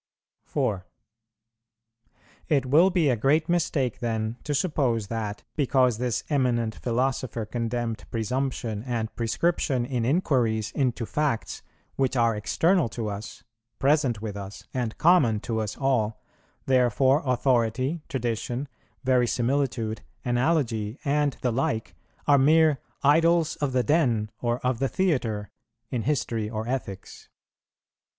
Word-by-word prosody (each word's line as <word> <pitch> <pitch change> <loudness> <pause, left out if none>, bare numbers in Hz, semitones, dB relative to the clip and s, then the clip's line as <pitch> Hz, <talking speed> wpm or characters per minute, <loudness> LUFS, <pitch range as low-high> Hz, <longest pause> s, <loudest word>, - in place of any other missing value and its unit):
4. 95 -1 -2 1.6
It 140 -4 +2
will 155 +8 +5
be 175 -6 +2
a - - +2
great 145 +7 +2
mistake 160 -8 0
then 110 -1 -2
to 145 - -1
suppose 130 - 0
that, 105 -3 -4
because 130 -5 +2
this 125 -2 -1
eminent 120 -6 +1
philosopher 125 -1 -1
condemned 115 0 -3
presumption 115 -1 -2
and 115 -2 -3
prescription 130 +1 0
in 125 -2 -2
inquiries 120 - +1
into 125 -3 -1
facts 145 -3 -2 0.4
which 135 -1 +1
are 115 -2 +3
external 165 - +2
to 110 -1 -4
us, 105 +2 -7 0.3
present 135 -6 +2
with 105 -2 -4
us, 100 0 -8
and 120 -4 -2
common 145 -11 +4
to 115 -2 -2
us 105 -1 -4
all, 115 -6 0 0.5
therefore 130 +2 +3
authority, 130 +3 +1
tradition, 120 +1 -2 0.4
verisimilitude, 125 -2 +1 0.2
analogy, 120 -4 0
and 145 0 +1
the 125 - +1
like, 115 -2 -1 0.3
are 145 -1 +6
mere 155 0 +4 0.2
"idols 165 +3 +4
of 145 -2 -1
the 125 -1 +2
den" 120 -7 +1
or 120 0 0
"of 125 -2 +1
the 135 0 +1
theatre" 120 - -1 0.4
in 125 - -1
history 115 -6 -1
or 110 0 -4
ethics. 110 -7 -5
125 Hz, 125 wpm, -26 LUFS, 115-140 Hz, 1.6 s, are